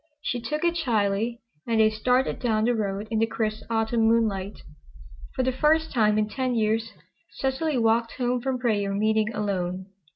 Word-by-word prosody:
She 245 - -2
took 300 +7 -3
it 340 0 +2
shyly, 230 -5 0 0.3
and 230 -1 +1
they 215 0 +5
started 250 +4 +1
down 220 -4 +1
the 245 - +2
road 205 -2 -2
in 220 - +1
the 225 - +2
crisp 220 -1 -2
Autumn 225 0 +1
moonlight. 210 -4 0 0.7
For 260 - 0
the 260 - +1
first 315 +4 +2
time 215 -4 +3
in 215 0 +1
ten 255 +2 -2
years 225 0 0 0.4
Cecily 270 +2 -1
walked 230 0 +2
home 245 -1 -1
from 265 0 -1
prayer 205 -5 0
meeting 215 +1 +1
alone. 190 -4 -2
225 Hz, 170 wpm, -25 LUFS, 215-250 Hz, 0.7 s, they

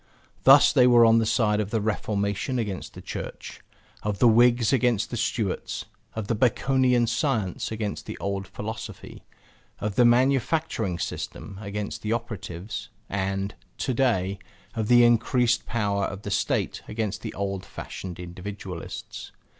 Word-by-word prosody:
Thus 135 +2 +8
they 125 -3 +6
were 120 -1 +7
on 115 0 +6
the 110 - +1
side 110 -2 +2
of 105 -2 -1
the 115 - 0
Reformation 105 +3 -1
against 105 -6 -4
the - - -10
Church, - - -7 0.4
of 105 -1 -2
the 120 - +5
Whigs 120 +1 +5
against 120 -5 +2
the - - -2
Stuarts, 110 -3 -2 0.3
of 110 -2 -3
the 115 - 0
Baconian 125 +1 +3
science 115 - -1
against 110 -2 -4
the - - -6
old 100 -1 -3
philosophy, 105 +4 -7 0.6
of 105 -1 -3
the 125 - +6
manufacturing 125 - +2
system 95 +2 -5
against 105 0 -4
the 110 +1 -1
operatives, 105 -4 -5 0.2
and 95 0 -1 0.2
(to 130 - -1
day) 100 -7 +1 0.3
of 110 -2 -2
the 120 +1 +7
increased 120 0 +3
power 100 -3 0
of 100 +2 -6
the 100 - -4
State - - 0
against 110 -1 -3
the - - -6
old 100 -1 -3
fashioned 90 -2 -8
individualists. 90 0 -7
110 Hz, 145 wpm, -26 LUFS, 100-120 Hz, 0.6 s, Thus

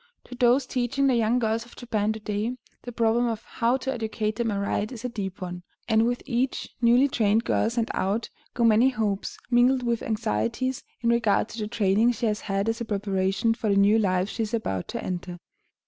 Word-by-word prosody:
To - - -12
those 250 +2 +3
teaching 255 +2 0
the 270 - +4
young 230 +1 +2
girls 225 -1 0
of 240 - -16
Japan 215 -3 -1
to 220 - -7
day, 215 +4 -3 0.2
the 245 - -7
problem 235 +1 +2
of 225 -2 -3
how 240 +1 0
to 265 0 -3
educate 220 -2 -2
them 235 -1 0
aright 200 +2 -1
is 245 -1 -8
a - - -1
deep 195 -5 -5
one, 180 0 -6 0.3
and 225 0 +3
with 245 0 -2
each 255 +1 -1
newly 245 +3 +5
trained 220 -3 +2
girl 225 - +1
sent 230 -1 -1
out 205 +5 -1 0.2
go 240 - +1
many 230 +3 +5
hopes, 210 -5 -2
mingled 250 +2 +4
with 235 -1 0
anxieties, 235 +3 -1 0.2
in 235 - +1
regard 230 -2 +2
to 230 - -8
the 210 - -2
training 215 +2 +2
she 235 - -3
has 210 -1 0
had 195 0 -1
as 225 +1 -1
a - - -2
preparation 195 +1 0
for 225 -1 -3
the 200 - +3
new 205 +3 +5
life 185 -2 +1
she 225 - -4
is 220 +1 -1
about 95 - -3
to - - -5
enter. 180 -1 -4
225 Hz, 210 wpm, -26 LUFS, 210-240 Hz, 0.3 s, newly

